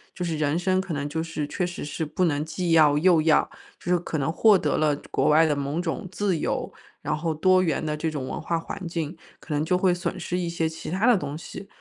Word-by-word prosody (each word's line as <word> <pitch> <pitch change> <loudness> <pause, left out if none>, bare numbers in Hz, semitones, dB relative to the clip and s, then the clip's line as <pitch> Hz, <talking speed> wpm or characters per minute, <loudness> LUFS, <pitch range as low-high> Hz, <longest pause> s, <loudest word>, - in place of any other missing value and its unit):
就 180 - -4
是 165 -3 -2
人 150 +1 +1
生 185 +1 +1
可 190 -3 -3
能 145 0 -3
就 160 +2 -2
是 160 -2 -3
确 175 +4 -2
实 175 - -6
是 150 +2 -3
不 170 +5 -1
能 150 -3 +1
既 170 +1 -2
要 150 -3 +5
又 170 0 +4
要， 160 -1 +3 0.3
就 175 - -4
是 180 - +3
可 160 - -4
能 145 +2 0
获 210 +3 +5
得 - - 0
了 150 -2 +2 0.2
国 - - +1
外 160 +2 +6
的 150 - +2
某 140 +5 -2
种 175 +2 -3
自 190 -2 -1
由， - - -2 0.3
然 155 - -1
后 160 +1 -1
多 185 +4 +4
元 160 -2 0
的 150 0 -2
这 160 +1 -1
种 145 -4 -4
文 - - -4
化 170 - -1
环 170 +2 -6
境， 165 -1 -4 0.2
可 155 - -6
能 150 +1 0
就 180 +3 +2
会 185 -1 +3
损 175 0 -3
失 180 - -3
一 175 -1 -2
些 165 -1 -1
其 160 - -8
它 190 +6 0
的 245 -3 +6
东 145 -3 -4
西。 195 +3 -9
165 Hz, 280 characters per minute, -25 LUFS, 150-180 Hz, 0.3 s, 外